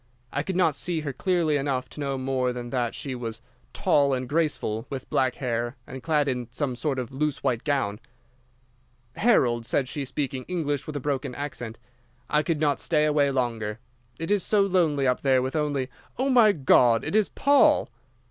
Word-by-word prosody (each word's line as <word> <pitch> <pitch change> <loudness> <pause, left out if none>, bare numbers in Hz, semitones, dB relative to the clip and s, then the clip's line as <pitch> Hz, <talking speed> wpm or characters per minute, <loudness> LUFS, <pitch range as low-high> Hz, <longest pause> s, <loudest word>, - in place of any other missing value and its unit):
I 145 - 0
could 185 +5 -4
not 165 -5 +3
see 170 -1 -1
her 145 -3 -4
clearly 170 -5 +1
enough 135 -2 -1
to - - -11
know 140 -2 -2
more 130 -1 0
than 120 -1 -6
that 120 -3 -1
she 135 - -4
was 115 -3 -5 0.3
tall 145 -8 +2
and 130 0 -4
graceful, 145 -8 -1
with 135 -2 -6
black 130 -2 +1
hair, 120 -1 -2
and 130 0 -8
clad 150 +1 +1
in 125 -3 -2
some 130 +1 -2
sort 140 +1 -2
of 125 -3 -4
loose 150 +2 -2
white 125 -4 0
gown. 130 -9 -1 1.2
"'Harold,' 120 - +2
said 135 - +1
she, 145 +2 -4
speaking 135 -1 -3
English 145 -6 -2
with 155 - -6
a - - -1
broken 135 -2 -2
accent. 120 -6 -6 0.5
'I 150 - +4
could 160 -1 -1
not 145 -2 +1
stay 150 -2 +2
away 145 -2 +3
longer. 115 -5 -2 0.4
It 165 +4 -3
is 205 -2 +3
so 205 +3 +2
lonely 165 -8 +2
up 125 -1 +1
there 135 -2 +3
with 130 +4 -3
only—Oh, 150 - -2
my 240 -5 +6
God, 125 -7 +4
it 160 - -2
is 215 -2 +3
Paul! 285 - +4
140 Hz, 185 wpm, -26 LUFS, 125-155 Hz, 1.2 s, my